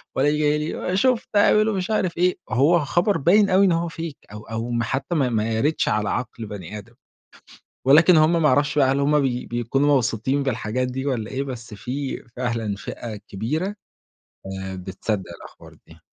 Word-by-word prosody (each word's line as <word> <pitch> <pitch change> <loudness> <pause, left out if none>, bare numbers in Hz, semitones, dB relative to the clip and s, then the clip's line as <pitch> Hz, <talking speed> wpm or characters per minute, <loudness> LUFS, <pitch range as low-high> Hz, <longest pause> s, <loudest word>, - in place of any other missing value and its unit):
والاقيه 145 +3 +2
جاي 150 0 +2
لي: 180 +1 -2
"شُفت 250 +2 +2
هبعملوا 215 +1 +4
مش 185 +3 -3
عارف 185 -6 0
إيه." 180 +1 +2
هو 145 +10 +4
خبر 175 +7 +1
باين 200 +7 +4
أوي 190 +2 +5
إن 185 - +3
هو 165 0 0
fake 165 -3 -7
أو 105 0 -9
أو 115 +1 -5
ما 120 0 0
حتى 135 +7 -2
ما 135 -5 +2
ما 110 -1 0
يَرِدش 145 +8 +1
على 105 0 0
عقل 115 -2 -4
بني 105 -1 -7
آدم، 105 - -12 0.9
ولكن 160 +6 +7
هُم 160 +2 +4
ما 150 - +5
أعرفش 145 +2 +2
بقى 135 -1 +4
هل 140 - 0
هُم 150 +1 +3
بي 125 -3 -1
بيكونوا 135 +5 +1
مبسوطين 130 +3 0
بالحاجات 125 0 -2
دي 130 +2 -4
والّا 115 -5 -2
إيه، 135 +1 -2
بس 120 -5 -7
في 130 +6 -5
فعلًا 115 -4 -2
فئة 110 +2 -7
كبيرة، 150 - -3 0.9
آآ، 95 0 -5
بتصدق 95 +2 -4 0.2
الأخبار - - -14
دي. - - -16
135 Hz, 180 wpm, -23 LUFS, 115-165 Hz, 0.9 s, ولكن